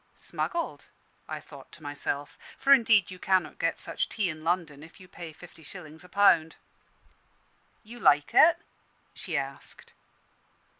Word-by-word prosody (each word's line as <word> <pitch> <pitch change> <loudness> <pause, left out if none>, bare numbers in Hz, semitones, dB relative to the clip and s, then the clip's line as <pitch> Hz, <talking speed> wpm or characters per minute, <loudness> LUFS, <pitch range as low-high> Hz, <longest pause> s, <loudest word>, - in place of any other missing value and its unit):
"Smuggled," 340 -1 -4 0.4
I - - -4
thought - - -14
to 155 - -12
myself; 145 0 -4 0.2
for 275 +1 +6
indeed 220 -8 +5
you 185 - -9
cannot 185 -6 +1
get 165 - 0
such - - -2
tea 205 -5 -1
in 155 0 -10
London 165 -4 -1
if 160 +5 -14
you 185 - -14
pay 170 -2 -9
fifty 165 +1 -15
shillings 160 -1 -11
a 180 - -15
pound. 170 -5 +4 1.3
"You 235 +2 -11
like 145 -8 +4
it?" 335 +1 +7 0.6
she 165 -5 -3
asked. 135 0 -5
170 Hz, 145 wpm, -28 LUFS, 155-200 Hz, 1.3 s, it